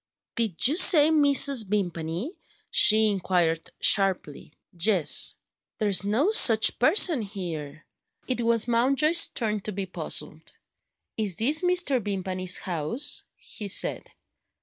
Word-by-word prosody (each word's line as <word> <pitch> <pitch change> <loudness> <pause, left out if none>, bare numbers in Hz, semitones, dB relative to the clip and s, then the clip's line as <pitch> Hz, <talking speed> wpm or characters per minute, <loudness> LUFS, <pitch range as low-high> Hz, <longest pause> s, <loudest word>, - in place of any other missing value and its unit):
"Did 225 -4 +1
you 300 +5 -1
say 320 -5 +5
Mrs. 280 -5 +3
Vimpany?" 180 - -5 0.4
she 220 -1 +4
inquired 175 -4 -3
sharply. 190 -8 0 0.2
"Yes." 180 -1 +2 0.4
"There's 200 -4 +1
no 235 - -1
such 225 - +3
person 310 - +2
here." 165 -7 -9 0.4
It 250 -2 -3
was 230 0 0
Mountjoy's 275 +8 +2
turn 215 -3 -4
to 215 - -7
be 195 -1 -6
puzzled. 185 - -4 0.6
"Is 210 -5 -2
this 285 - +2
Mr. 355 - 0
Vimpany's 185 -2 -2
house?" 180 - -4
he 210 - -10
said. 195 - +1
215 Hz, 115 wpm, -23 LUFS, 185-270 Hz, 0.6 s, say